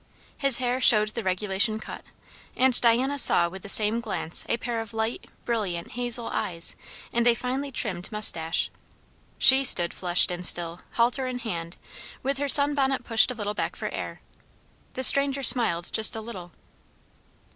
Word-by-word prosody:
His 275 -4 +3
hair 255 0 -4
showed 215 -3 +4
the 230 +2 -7
regulation 195 +3 -1
cut; - - -11 0.5
and 255 -1 +1
Diana 255 +4 0
saw 175 -8 +4
with 190 +2 -12
the 200 - -9
same 215 +3 +3
glance 200 -7 -3
a 235 - -1
pair 235 -2 -6
of 225 -1 -12
light, 220 +1 -5 0.2
brilliant, 200 -8 -5
hazel 240 -1 +1
eyes 170 -2 -5 0.4
and 235 0 -1
a 235 - +2
finely 265 +4 -6
trimmed 190 -7 -6
mustache. 165 -7 0 0.7
She 265 +1 +5
stood 175 -9 +6
flushed 180 0 +1
and 180 0 -7
still, 170 -1 0
halter 245 +3 -2
in 255 -1 -6
hand, 175 -8 -8 0.5
with 275 +1 -4
her 285 0 -4
sun 285 +1 +8
bonnet 270 -2 -3
pushed 225 0 +2
a 250 - -6
little 210 -2 -6
back - - -6
for - - -7
air. - - -9 0.7
The 260 - -5
stranger 275 0 +5
smiled 200 -11 +2
just 220 0 +4
a 220 - -7
little. 190 -6 -12
230 Hz, 170 wpm, -23 LUFS, 190-255 Hz, 0.7 s, sun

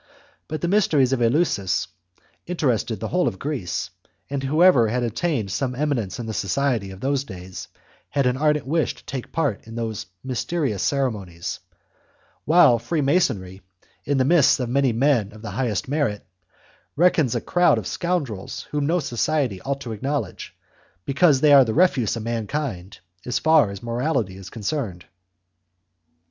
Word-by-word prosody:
But 155 -1 -5
the - - 0
mysteries 155 -10 +3
of 125 - 0
Eleusis 115 - +1 0.6
interested 125 - -1
the 110 - -4
whole 180 0 +1
of 95 - -2
Greece, 135 - -3 0.4
and 140 -1 -2
whoever 145 -3 +5
had 125 +3 -1
attained 115 - -1
some 125 +4 -2
eminence 125 -9 -1
in 120 - -5
the 110 - -4
society 105 +2 0
of 95 +1 -11
those 135 0 0
days 95 -6 -9 0.4
had 140 -2 0
an 125 0 +2
ardent 150 -1 +1
wish 155 +3 0
to - - -19
take 130 -3 -5
a - - -32
part 145 -11 -2
in 115 - -9
those 110 -3 -4 0.2
mysterious 130 - -2
ceremonies, 105 -9 -2 0.9
while 155 -8 +6
Freemasonry, 130 - 0 0.4
in 145 -1 0
the 130 - +3
midst 150 -2 +4
of 125 -2 -2
many 135 0 +2
men 115 -4 +1
of 110 +1 -13
the - - -5
highest 115 -8 -1
merit, 135 -8 -1 0.7
reckons 160 -6 +3
a - - +1
crowd 175 0 +3
of - - -4
scoundrels 145 - -3
whom 145 -1 0
no 175 +3 +2
society 135 - -1
ought 140 0 -3
to 120 - -6
acknowledge, 130 -2 -4 0.5
because 140 -1 +3
they 150 -1 +6
are 140 -1 +9
the 110 -3 -2
refuse 140 - +3
of 110 - -5
mankind 115 -4 -4 0.2
as 125 - -1
far 160 -8 +4
as 100 +1 -8
morality 120 -4 -1
is 95 -1 -10
concerned. 110 - -4
130 Hz, 160 wpm, -23 LUFS, 110-150 Hz, 0.9 s, are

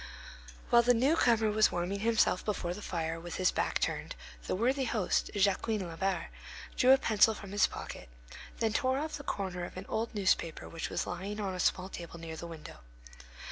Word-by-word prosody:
While 235 - +7
the 245 +1 +4
newcomer 235 -4 +3
was 215 0 +4
warming 180 +3 -2
himself 220 -4 +2
before 185 -4 -2
the 210 - -8
fire, 165 -3 -3
with 175 0 -7
his 185 -1 +2
back - - 0
turned, - - -2 0.3
the - - 0
worthy 260 +6 +1
host, 215 -6 0
Jacquin 205 +2 +1
Labarre, 180 +2 -2 0.5
drew 255 - +3
a 265 - +8
pencil 220 -3 +4
from 200 -2 -9
his 205 - +4
pocket, - - -8 0.5
then 225 -2 0
tore 260 +1 +1
off 310 +2 -3
the 285 - -9
corner 185 -7 -3
of 175 - -7
an 185 - -6
old 225 0 -2
newspaper 190 -5 0
which 165 - -5
was - - -2
lying 195 +4 -5
on 195 -2 -2
a 185 - -5
small 185 +1 +1
table 170 -2 -8
near 165 -1 -7
the 170 - -7
window. 160 -2 -10
200 Hz, 190 wpm, -31 LUFS, 175-225 Hz, 0.5 s, a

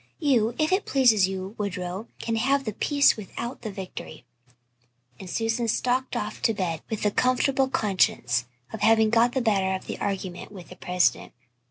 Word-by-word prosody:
You, 245 -7 +2
if 310 +2 +1
it 380 +2 +1
pleases 230 -8 +4
you, 190 +1 -5
Woodrow, 190 +1 -4
can 230 - -2
have 275 +4 +2
the 215 - -3
peace 285 +6 +3
without 230 +4 -7
the 225 - -5
victory" 190 -5 -8 0.9
and 190 - -9
Susan 225 +3 -1
stalked 250 +3 0
off 210 - -4
to 225 - +2
bed 170 -5 -2
with 220 - -3
the 210 - +2
comfortable 260 +3 +2
consciousness 125 - +1 0.3
of 220 - -6
having 220 -1 +4
got 235 +1 +3
the 265 - 0
better 195 -5 +1
of 190 - -7
the - - -6
argument 190 -2 -4
with 185 -4 -11
the 180 - -10
President. 180 -1 0
220 Hz, 175 wpm, -25 LUFS, 190-245 Hz, 0.9 s, pleases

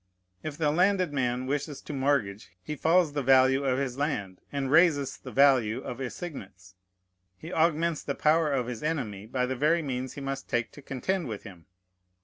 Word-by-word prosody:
If 150 -2 -6
the 150 -3 +2
landed 185 -1 +2
man 125 -2 -1
wishes 145 +1 -3
to 150 - -7
mortgage, 130 -8 0
he 150 - -4
falls 165 0 +3
the 145 - -1
value 135 +1 +4
of 130 -2 +1
his 135 -1 -3
land 100 - -2
and 135 -2 -2
raises 155 -4 +4
the - - -10
value 130 -5 +4
of 125 -1 -6
assignats. 100 - -7 0.6
He 165 - -9
augments 165 0 +1
the 140 - -3
power 155 0 +3
of 130 -3 0
his 120 -2 -6
enemy 115 -11 -3
by 125 +2 0
the 130 +1 -2
very 155 +6 +2
means 130 -2 -4
he 140 - -8
must 135 0 -5
take 120 0 -1
to 145 - -13
contend 160 +6 -2
with 110 -3 -6
him. 90 -5 -13
135 Hz, 185 wpm, -28 LUFS, 125-155 Hz, 0.6 s, value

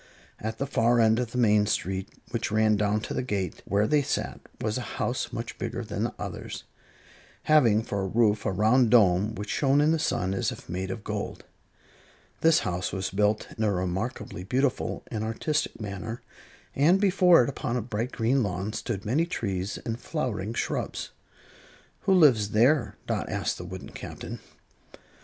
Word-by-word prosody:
At 110 +1 -4
the 140 - -1
far 120 -3 +2
end 110 0 +4
of 125 -2 -1
the 125 - -4
main 105 -3 +4
street, 95 -2 -1 0.2
which - - -1
ran 110 0 +3
down 105 +1 +1
to - - -5
the - - -1
gate 100 -8 -3
where 100 +2 +2
they 145 +6 +3
sat, 135 - -2 0.2
was 110 +3 -1
a 125 - -7
house 125 - -1
much 115 +1 -6
bigger 120 +1 -3
than 105 +1 -2
the - - -3
others, - - -6 0.8
having 120 -9 +4
for 100 -3 -3
a 95 - -1
roof 105 0 +2
a - - 0
round 110 +5 +4
dome 105 -2 +4
which 105 +1 -5
shone 140 0 +3
in 150 +2 +4
the 165 - +1
sun 95 -10 0
as 95 - 0
if - - -10
made 95 +2 -3
of 100 +2 -5
gold. - - -4 0.9
This 160 -1 +4
house 90 -1 -2
was 95 -1 -3
built 105 +2 +1
in 110 - -2
a 105 - +3
remarkably 95 +1 -3
beautiful 130 +6 -1
and 110 -1 -2
artistic 145 +8 -1
manner, 110 +2 -5 0.5
and 165 +7 +4
before 185 -6 +5
it, 120 - -1
upon 125 -2 -2
a - - -1
bright 115 +2 -3
green 120 +4 +1
lawn, 100 0 -2
stood 105 -5 -4
many 145 +10 +1
trees 100 - -3
and 115 +1 -3
flowering 115 - -3
shrubs. - - -3 0.9
"Who 195 - +4
lives 125 - +5
there?" 130 +8 +3
Dot - - -2
asked - - -2
the 90 - -6
wooden 95 +1 -8
Captain. - - -7
110 Hz, 180 wpm, -27 LUFS, 100-125 Hz, 0.9 s, before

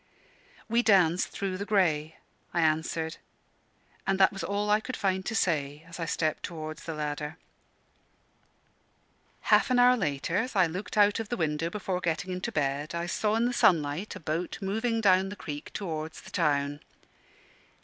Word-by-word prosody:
"We 235 +1 +3
danced 185 -6 +4
through 190 -1 -3
the - - -2
grey," 160 -7 +1 0.4
I 170 - +3
answered; 160 0 0 0.9
and 195 0 +2
that 190 - +5
was 195 - -5
all 205 +1 -1
I 210 - +5
could 255 +4 -6
find 190 -1 0
to 225 - -2
say, 150 -5 0
as 165 +1 -10
I 165 - -1
stepped 155 -1 -1
towards 155 -2 -6
the 165 - -4
ladder. 150 0 -4 2.2
Half - - +5
an 255 - +3
hour 250 0 +6
later 150 - -1
as 230 +3 -1
I 185 -2 +5
looked 185 +6 -5
out 205 +1 +5
of 225 -2 -4
the 240 - -2
window 160 -1 0
before 185 -1 -3
getting 175 +2 -1
into 180 +1 -3
bed 145 +2 -1
I 170 0 -2
saw 210 +4 0
in 230 +1 +2
the 245 - 0
sunlight 165 -1 +2
a - - -7
boat 165 +2 -3
moving 225 +3 -1
down 190 -2 +4
the 205 - -6
creek 145 -6 -7
towards 160 -5 -4
the 190 - -13
town. 145 -4 +1
180 Hz, 170 wpm, -28 LUFS, 155-205 Hz, 2.2 s, hour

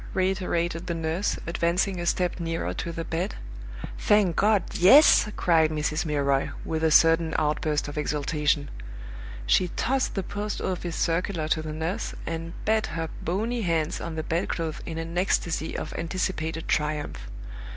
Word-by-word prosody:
reiterated 180 -2 0
the 170 - -1
nurse, 165 +4 -1
advancing 175 +3 0
a 175 - -3
step 180 0 0
nearer 165 -1 -2
to 170 - -4
the 165 0 -4
bed. 165 - -2 0.6
"Thank 205 -5 +3
God 210 -1 +3
yes!" 210 - +7
cried 160 -3 +4
Mrs. 155 +1 -1
Milroy, 140 -2 +1 0.2
with 160 0 -2
a 160 - +4
sudden 165 +1 +4
outburst 150 -1 0
of 145 +1 -4
exultation. 150 -1 0 0.7
She 180 - +3
tossed 260 +9 -1
the 195 - -1
Post 205 +2 -4
office 175 -2 -3
circular 170 -1 0
to 160 - +1
the 155 0 -5
nurse, 160 +4 -3
and 165 0 -4
beat 220 0 +2
her 165 0 -4
bony 225 +7 -1
hands 165 -4 0
on 165 -1 -5
the 160 - -3
bedclothes 165 -1 -2
in 160 - -5
an 165 +1 -5
ecstasy 175 -3 0
of - - -5
anticipated 165 -2 -3
triumph. 150 -1 -2
165 Hz, 150 wpm, -26 LUFS, 155-185 Hz, 0.7 s, yes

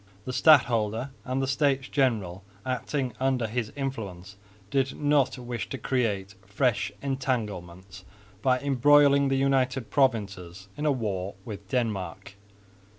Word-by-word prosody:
The 130 - -4
stadholder, 120 -4 +4
and 130 +1 -1
the - - -1
States 135 -1 +1
General 105 -10 0 0.2
acting 130 +1 -2
under 130 -2 +1
his 110 0 -3
influence, 100 -9 -5 0.4
did 135 -1 0
not 145 -3 +2
wish 120 -4 -5
to 135 - -4
create 105 -8 -1
fresh 105 +2 0
entanglements 100 -9 -3 0.4
by 130 +1 +2
embroiling 140 +1 +5
the 135 0 +1
United 135 -2 +1
Provinces 100 -8 0
in 150 +1 -2
a - - +4
war 100 -7 -3
with 100 -3 -8
Denmark. 100 -6 -2
125 Hz, 125 wpm, -27 LUFS, 100-135 Hz, 0.4 s, embroiling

